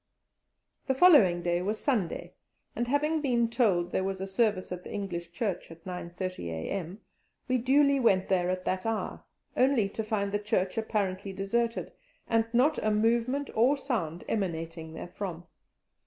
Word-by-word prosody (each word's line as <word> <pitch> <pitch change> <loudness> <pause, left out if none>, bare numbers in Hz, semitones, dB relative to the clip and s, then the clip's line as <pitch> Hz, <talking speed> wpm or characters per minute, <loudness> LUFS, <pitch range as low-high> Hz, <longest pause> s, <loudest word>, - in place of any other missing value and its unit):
The 265 - +2
following 230 - +6
day 175 0 +1
was 210 +4 -2
Sunday, 220 - -1 0.4
and 240 - -1
having 300 +4 +1
been 240 -5 +2
told 195 -8 +2
there 190 - 0
was 190 0 -2
a 190 - -3
service 195 -1 0
at 180 0 -5
the - - -9
English 175 -4 -4
Church 195 +1 -3
at 165 0 -14
9.30 180 - -5
a.m., 165 - -4 0.5
we 255 -1 +2
duly 280 +3 +4
went 195 -7 +3
there 180 -2 +1
at 185 0 -2
that 185 +3 -1
hour, 225 -1 -3 0.3
only 255 -5 +3
to 220 - -4
find 205 -2 -1
the 205 - 0
church 195 -3 0
apparently 200 -3 -2
deserted, 230 +5 -1 0.4
and 225 0 +1
not 260 +6 +3
a 215 - +2
movement 235 +6 +1
or 255 +6 +4
sound 185 - -3
emanating 165 -5 -3
therefrom. 175 0 -6
205 Hz, 155 wpm, -29 LUFS, 180-235 Hz, 0.5 s, following